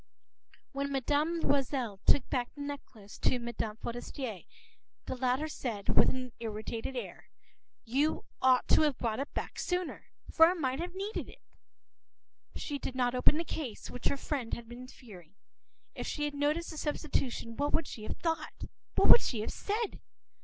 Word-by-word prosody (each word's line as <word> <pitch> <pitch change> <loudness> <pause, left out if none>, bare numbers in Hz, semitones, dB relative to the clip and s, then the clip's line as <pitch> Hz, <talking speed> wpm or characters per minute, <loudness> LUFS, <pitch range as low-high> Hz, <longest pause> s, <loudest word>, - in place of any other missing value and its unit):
p> - - -24
When 280 0 -2
Mme. 295 +5 +1
Loisel 260 -7 +1
took 270 - +6
back 245 -2 -1
the 290 - -7
necklace 265 -8 -7
to - - +3
Mme. 235 -3 -3
Forester, 240 -2 -4 0.7
the - - -3
latter 255 +4 +1
said, 230 -9 -4
with - - +6
an 255 -1 -3
irritated 225 +3 -4
air:— 245 - -6 0.6
“You 275 +7 +1 0.2
ought 255 -1 +5
to - - +7
have 295 -4 +3
brought 225 -1 -1
it 280 - -3
back - - -4
sooner, 360 -1 -2 0.2
for 325 0 +8
I 360 - +2
might 265 -5 -1
have 355 +2 -4
needed 400 +3 -3
it.” - - -15 1.1
She 285 -2 -3
did 255 - -4
not 250 -1 +2
open 255 +4 +4
the 330 - 0
case, 275 -10 -5
which 250 - -3
her 280 - +1
friend 265 -4 -2
had 235 -1 -9
been 245 +2 -9
fearing. 195 -9 -13 0.6
If - - -5
she 295 - -1
had 295 - -2
noticed 300 +4 0
the 315 - -8
substitution, 270 -6 -1
what 290 +3 0
would 325 - +3
she 230 - -7
have 215 - -4
thought? 325 -1 -2 0.3
What - - +4
would - - +11
she 225 -4 -1
have 215 - -3
said? 425 +1 -2
265 Hz, 175 wpm, -32 LUFS, 235-300 Hz, 1.1 s, would